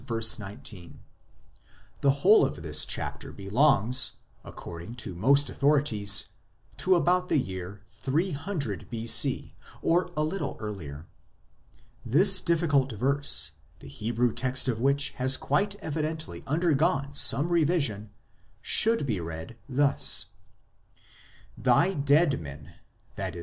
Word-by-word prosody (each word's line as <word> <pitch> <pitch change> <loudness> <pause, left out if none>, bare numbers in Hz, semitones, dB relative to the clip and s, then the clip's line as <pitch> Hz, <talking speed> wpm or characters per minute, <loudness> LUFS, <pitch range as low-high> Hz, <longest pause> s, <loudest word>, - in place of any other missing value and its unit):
19; 110 -4 -1 1.0
the 140 - +3
whole 145 +10 +4
of 135 - -3
this 75 -1 +1
chapter - - -3
belongs, 125 +3 +2 0.3
according 85 +7 -10
to 120 -6 -6
most 140 +10 +2
authorities, 130 -9 +1 0.5
to 185 0 +2
about 180 +2 +1
the - - +2
year 95 -4 -5
300 145 - -3
B.C. 115 -1 +1 0.3
or 175 +2 +1
a 155 - +1
little 185 +6 -4
earlier. 85 -8 -8 1.0
This 185 - +5
difficult 155 -6 +1
verse, 140 +6 +1 0.3
the - - -14
Hebrew 115 - -2
text 130 +2 0
of 115 -3 -1
which 140 +2 +1
has 130 +1 +5
quite 200 +9 -1
evidently 155 -2 -4
undergone 150 -2 0
some 145 +2 +3
revision, 150 - 0 0.5
should 225 -7 +3
be 110 -8 -2
read 80 +5 -8
thus: 140 +2 +2 0.5
" - - -28
Thy 190 +3 +2
dead 145 - +2
men 70 -1 -11 0.5
[i.e. 85 - -5
135 Hz, 115 wpm, -27 LUFS, 105-155 Hz, 1.0 s, This